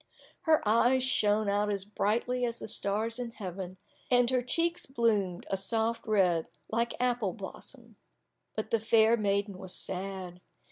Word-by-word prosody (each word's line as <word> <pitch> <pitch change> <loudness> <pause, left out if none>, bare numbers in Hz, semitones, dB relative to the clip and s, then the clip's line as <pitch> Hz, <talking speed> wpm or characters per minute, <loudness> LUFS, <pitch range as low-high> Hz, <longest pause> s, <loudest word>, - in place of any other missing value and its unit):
Her 310 -8 +4
eyes 240 +4 +4
shone 215 -4 +2
out 205 +1 +1
as 200 -2 +1
brightly 230 +4 0
as 235 -1 -1
the - - -7
stars 220 +3 0
in 245 -1 -3
heaven, 190 -4 -7 0.3
and 245 0 +4
her 255 -1 +2
cheeks 335 +7 -1
bloomed 215 -8 0
a 195 - +1
soft 225 +4 -1
red 180 -6 +2 0.2
like 235 +1 0
apple 245 -6 0
blossom. 230 +2 -10 0.6
But 215 0 -4
the 230 - +3
fair 220 +1 +4
maiden 200 -2 -1
was 185 -1 -4
sad. 185 -1 -4
220 Hz, 150 wpm, -30 LUFS, 195-235 Hz, 0.6 s, Her